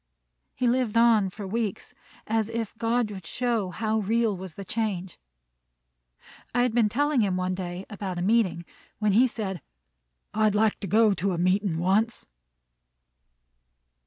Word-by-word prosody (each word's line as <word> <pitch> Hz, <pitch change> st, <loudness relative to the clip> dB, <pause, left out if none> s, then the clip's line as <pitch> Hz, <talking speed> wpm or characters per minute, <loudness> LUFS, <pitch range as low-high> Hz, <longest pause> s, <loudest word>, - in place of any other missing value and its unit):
He 255 Hz, -, -1 dB
lived 240 Hz, -2 st, +1 dB
on 225 Hz, -4 st, +5 dB
for 200 Hz, +2 st, -8 dB
weeks, 215 Hz, 0 st, -3 dB, 0.3 s
as 220 Hz, 0 st, 0 dB
if 230 Hz, -2 st, -4 dB
God 230 Hz, -1 st, +1 dB
would 190 Hz, -4 st, -8 dB
show 235 Hz, -6 st, -1 dB
how 220 Hz, +3 st, -1 dB
real 220 Hz, +1 st, +1 dB
was 185 Hz, -3 st, -8 dB
the 200 Hz, -, -8 dB
change. 190 Hz, -4 st, -3 dB, 1.4 s
I 245 Hz, -, +4 dB
had 245 Hz, -2 st, 0 dB
been 225 Hz, -3 st, +3 dB
telling 290 Hz, +2 st, +1 dB
him 190 Hz, -3 st, +1 dB
one 185 Hz, 0 st, -1 dB
day 180 Hz, 0 st, -5 dB
about 195 Hz, -3 st, -5 dB
a 175 Hz, -, -2 dB
meeting, 190 Hz, -5 st, +2 dB, 0.3 s
when 210 Hz, -1 st, +1 dB
he 240 Hz, +6 st, +5 dB
said, 195 Hz, -6 st, -4 dB, 0.7 s
"I'd 215 Hz, -1 st, +2 dB
like 215 Hz, 0 st, +2 dB
to 200 Hz, -, -5 dB
go 215 Hz, +2 st, +4 dB
to 195 Hz, +1 st, -1 dB
a -, -, -2 dB
meetin' 185 Hz, 0 st, +1 dB
once." 200 Hz, +7 st, +1 dB
210 Hz, 155 wpm, -26 LUFS, 190-230 Hz, 1.4 s, on